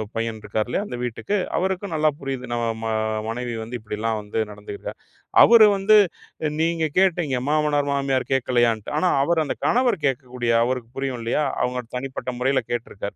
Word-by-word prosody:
பையன் 115 Hz, -1 st, -2 dB
இருக்காருல்ல, 110 Hz, -, -2 dB
அந்த 125 Hz, -, -6 dB
வீட்டுக்கு, 125 Hz, -, -2 dB, 0.2 s
அவருக்கும் 190 Hz, 0 st, -1 dB
நல்லா 155 Hz, 0 st, +3 dB
புரியுது 130 Hz, -3 st, -5 dB
நம்ம 120 Hz, 0 st, -1 dB, 0.2 s
ம -, -, -1 dB, 0.4 s
மனைவி 120 Hz, +1 st, -3 dB
வந்து 120 Hz, +2 st, -5 dB
இப்டிலாம் 110 Hz, +1 st, -2 dB
வந்து 105 Hz, +2 st, -4 dB
நடந்துக்கிறா. 105 Hz, 0 st, -8 dB, 0.5 s
அவரு 230 Hz, -2 st, +8 dB
வந்து 210 Hz, +2 st, +5 dB, 0.6 s
நீங்க 165 Hz, -1 st, +1 dB
கேட்டீங்க 170 Hz, -9 st, +2 dB
மாமனார், 150 Hz, -2 st, +1 dB
மாமியார் 135 Hz, -2 st, 0 dB
கேட்கலையான்டு 120 Hz, -4 st, +1 dB
ஆனா, 180 Hz, +3 st, +2 dB
அவரு 165 Hz, +1 st, +2 dB
அந்த -, -, -3 dB
கணவர் 240 Hz, -, +2 dB
கேட்கக்கூடிய 125 Hz, -2 st, -2 dB
அவருக்கு 125 Hz, -1 st, -2 dB
புரியும் 135 Hz, -3 st, -2 dB
இல்லையா 120 Hz, +6 st, 0 dB, 0.2 s
அவங்க 125 Hz, 0 st, -1 dB, 0.2 s
தனிப்பட்ட 130 Hz, 0 st, -5 dB
முறையில 135 Hz, +2 st, +2 dB
கேட்டிருக்கார். 105 Hz, -4 st, -4 dB
130 Hz, 150 wpm, -23 LUFS, 115-155 Hz, 0.6 s, அவரு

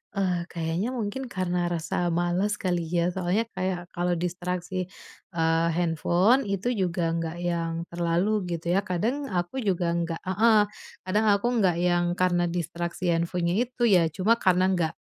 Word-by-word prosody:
Ah, 180 Hz, -3 st, 0 dB
kayaknya 170 Hz, +5 st, -2 dB
mungkin 245 Hz, +3 st, -3 dB
karena 180 Hz, -4 st, -1 dB
rasa 175 Hz, +1 st, -1 dB
males 175 Hz, +4 st, +1 dB
kali 180 Hz, -4 st, -1 dB
ya 175 Hz, +1 st, +1 dB
soalnya 185 Hz, +4 st, 0 dB
kayak 185 Hz, -1 st, -3 dB
kalau 175 Hz, 0 st, 0 dB
distraksi, 180 Hz, +1 st, -3 dB, 0.5 s
eee, 165 Hz, 0 st, +2 dB
handphone 175 Hz, -, +2 dB
itu 200 Hz, +5 st, -1 dB
juga 180 Hz, -5 st, 0 dB
nggak 165 Hz, 0 st, -2 dB
yang 170 Hz, -1 st, -1 dB, 0.2 s
terlalu 170 Hz, +3 st, 0 dB, 0.3 s
gitu 170 Hz, +1 st, -3 dB
ya 190 Hz, -, +4 dB
kadang 235 Hz, +11 st, -1 dB
aku 180 Hz, +7 st, -2 dB
juga 180 Hz, -6 st, 0 dB
nggak 165 Hz, -1 st, -3 dB
heeh, 215 Hz, +4 st, +4 dB, 0.5 s
kadang 210 Hz, +4 st, +1 dB
aku 200 Hz, +4 st, +1 dB
nggak 185 Hz, -4 st, +3 dB
yang 175 Hz, 0 st, +2 dB
karena 175 Hz, -1 st, +2 dB
distraksi 170 Hz, +1 st, -2 dB
handphonenya 170 Hz, +1 st, 0 dB
itu 250 Hz, 0 st, -4 dB
ya 185 Hz, -8 st, +5 dB
cuma 200 Hz, +5 st, +3 dB
karena 185 Hz, -1 st, +3 dB
nggak 165 Hz, -3 st, 0 dB
180 Hz, 150 wpm, -26 LUFS, 170-190 Hz, 0.5 s, ya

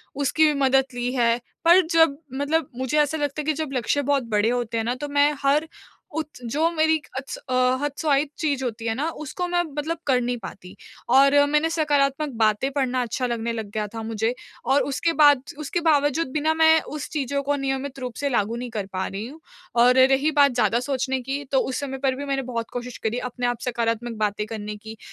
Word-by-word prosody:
उसकी 285 Hz, +3 st, +2 dB
भी 305 Hz, -, +3 dB
मदद 270 Hz, 0 st, +4 dB
ली 245 Hz, 0 st, -2 dB
है। 235 Hz, -2 st, +2 dB, 0.3 s
पर 345 Hz, +3 st, +8 dB, 0.2 s
जब 325 Hz, -4 st, +5 dB, 0.2 s
मतलब 285 Hz, +2 st, 0 dB
मुझे 260 Hz, +3 st, -1 dB
ऐसा 295 Hz, +2 st, 0 dB
लगता 290 Hz, 0 st, -2 dB
है -, -, -8 dB
कि 310 Hz, -, +1 dB
जब 305 Hz, -, -6 dB
लक्ष्य 255 Hz, +3 st, 0 dB
बहुत 280 Hz, -1 st, +1 dB
बड़े 210 Hz, +2 st, +3 dB
होते 240 Hz, -2 st, -1 dB
हैं 225 Hz, -, 0 dB
ना 240 Hz, +2 st, -1 dB
तो 290 Hz, +3 st, -5 dB
मैं 285 Hz, +1 st, +3 dB
हर 295 Hz, +3 st, +2 dB, 0.5 s
उत 315 Hz, -1 st, -2 dB, 0.2 s
जो 300 Hz, +8 st, +1 dB
मेरी 315 Hz, -1 st, +2 dB, 0.2 s
अ, -, -, -1 dB, 0.6 s
हतोत्साहित 290 Hz, 0 st, 0 dB
चीज़ 285 Hz, -4 st, 0 dB
होती 230 Hz, -2 st, -4 dB
है 225 Hz, -, +1 dB
ना 295 Hz, +6 st, -1 dB
उसको 355 Hz, +5 st, -4 dB
मैं 350 Hz, 0 st, +1 dB
मतलब 310 Hz, +1 st, -4 dB
कर 260 Hz, -2 st, +4 dB
नहीं 245 Hz, 0 st, -1 dB
पाती। 180 Hz, -1 st, -9 dB, 0.4 s
और 275 Hz, +1 st, +6 dB
मैंने 300 Hz, +2 st, +2 dB
सकारात्मक 295 Hz, -2 st, +1 dB
बातें 215 Hz, +5 st, +2 dB
पढ़ना 260 Hz, -2 st, 0 dB
अच्छा 250 Hz, +2 st, -2 dB
लगने 235 Hz, -1 st, -2 dB
लग 220 Hz, -3 st, -5 dB
गया 210 Hz, 0 st, -2 dB
था 225 Hz, -, -4 dB
मुझे 225 Hz, +1 st, -1 dB, 0.3 s
और 270 Hz, +3 st, +3 dB
उसके 330 Hz, +4 st, -1 dB
बाद 290 Hz, -4 st, +6 dB, 0.2 s
उसके 305 Hz, +3 st, -2 dB
बावजूद 290 Hz, +1 st, +2 dB
बिना 310 Hz, +1 st, +1 dB
मैं 320 Hz, 0 st, +5 dB
उस 295 Hz, -1 st, -7 dB
चीज़ों 280 Hz, -1 st, -1 dB
को 290 Hz, +1 st, 0 dB
नियमित 270 Hz, 0 st, -3 dB
रूप 250 Hz, -2 st, -5 dB
से 285 Hz, -, -1 dB
लागू 230 Hz, -3 st, 0 dB
नहीं 245 Hz, +1 st, -5 dB
कर 210 Hz, -3 st, -3 dB
पा 185 Hz, 0 st, -1 dB
रही 200 Hz, +3 st, -5 dB
हूँ। 295 Hz, +5 st, -12 dB, 0.4 s
और 250 Hz, +1 st, +5 dB
रही 270 Hz, +4 st, +4 dB
बात 285 Hz, -2 st, +5 dB
ज़्यादा 240 Hz, -1 st, +2 dB
सोचने 265 Hz, 0 st, -1 dB
की 275 Hz, +3 st, -4 dB
तो 270 Hz, -, +4 dB
उस 260 Hz, -, -2 dB
समय 270 Hz, -2 st, -4 dB
पर 265 Hz, -1 st, +2 dB
भी 285 Hz, +2 st, -5 dB
मैंने 275 Hz, -1 st, -1 dB
बहुत 235 Hz, -2 st, -4 dB
कोशिश 245 Hz, 0 st, -5 dB
करी 225 Hz, +2 st, -1 dB
अपने 245 Hz, 0 st, -2 dB
आप 245 Hz, -2 st, -2 dB
सकारात्मक 235 Hz, -1 st, -2 dB
बातें 210 Hz, 0 st, -1 dB
करने 210 Hz, -1 st, -5 dB
की। 220 Hz, +1 st, -10 dB
270 Hz, 215 wpm, -24 LUFS, 240-295 Hz, 0.6 s, पर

